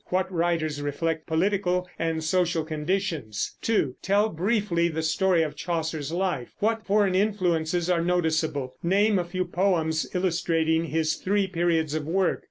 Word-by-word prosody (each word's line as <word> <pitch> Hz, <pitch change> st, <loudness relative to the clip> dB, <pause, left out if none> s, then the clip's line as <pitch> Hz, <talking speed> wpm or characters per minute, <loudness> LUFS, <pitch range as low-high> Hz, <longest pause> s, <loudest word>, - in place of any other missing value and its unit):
What 185 Hz, +1 st, 0 dB
writers 165 Hz, -3 st, 0 dB
reflect 160 Hz, +3 st, -2 dB
political 180 Hz, +1 st, +1 dB
and 165 Hz, -1 st, -1 dB
social 170 Hz, 0 st, +1 dB
conditions? 155 Hz, -, -2 dB
2. 155 Hz, -, 0 dB
Tell 205 Hz, +3 st, +2 dB
briefly 185 Hz, -1 st, +1 dB
the 160 Hz, -1 st, -3 dB
story 175 Hz, +1 st, +2 dB
of 150 Hz, -, -4 dB
Chaucer's 160 Hz, -4 st, -3 dB
life. 175 Hz, -8 st, -2 dB
What 220 Hz, +1 st, 0 dB
foreign 200 Hz, -1 st, +3 dB
influences 180 Hz, -4 st, +1 dB
are 175 Hz, -2 st, +2 dB
noticeable? 160 Hz, -6 st, 0 dB
Name 200 Hz, +3 st, +3 dB
a -, -, 0 dB
few 185 Hz, +1 st, -3 dB
poems 165 Hz, -4 st, 0 dB
illustrating 165 Hz, -2 st, +1 dB
his 160 Hz, -1 st, 0 dB
three 200 Hz, +1 st, +1 dB
periods 170 Hz, -4 st, 0 dB
of 155 Hz, -1 st, -3 dB
work. 185 Hz, +2 st, +1 dB
170 Hz, 145 wpm, -26 LUFS, 160-190 Hz, -, foreign